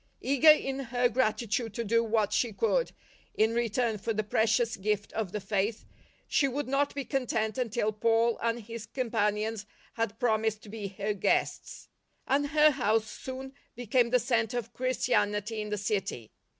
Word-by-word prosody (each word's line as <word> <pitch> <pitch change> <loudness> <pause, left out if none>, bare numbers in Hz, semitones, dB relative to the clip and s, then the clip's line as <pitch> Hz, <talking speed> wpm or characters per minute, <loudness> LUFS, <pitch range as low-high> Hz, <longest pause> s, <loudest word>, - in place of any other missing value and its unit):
Eager 280 +3 +5
in 270 -3 +4
her 245 -1 +1
grati 230 -2 0
tude 220 0 -2
to 235 - -2
do 230 +2 +2
what 215 -2 +1
she 235 +1 +1
could 485 - 0 0.4
in 220 +1 +2
return 235 -1 0
for 225 +3 -2
the 215 0 -1
precious 220 +2 +1
gift 205 +1 -2
of 215 -5 -2
the 210 - -3
Faith, 205 +2 -2 0.4
she 280 - +2
would 275 +1 -3
not 275 +2 0
be 280 -2 -3
content 225 -5 -1
until 230 -3 0
Paul 225 +2 +2
and 230 0 0
his 225 0 -8
companions 215 -3 -1 0.3
had 225 -2 -2
promised 220 -2 0
to 210 - -12
be 210 -1 -5
her 200 +2 -3
guests; 200 - -1 0.4
and 285 +2 +1
her 305 +1 +5
house 225 -5 +1
soon 265 +1 -7 0.2
became 240 0 +1
the 250 - +4
centre 235 -1 0
of 240 - -5
Christianity 220 -4 0
in 210 - -5
the 210 - -2
city. 200 - -3
225 Hz, 170 wpm, -29 LUFS, 210-250 Hz, 0.4 s, Eager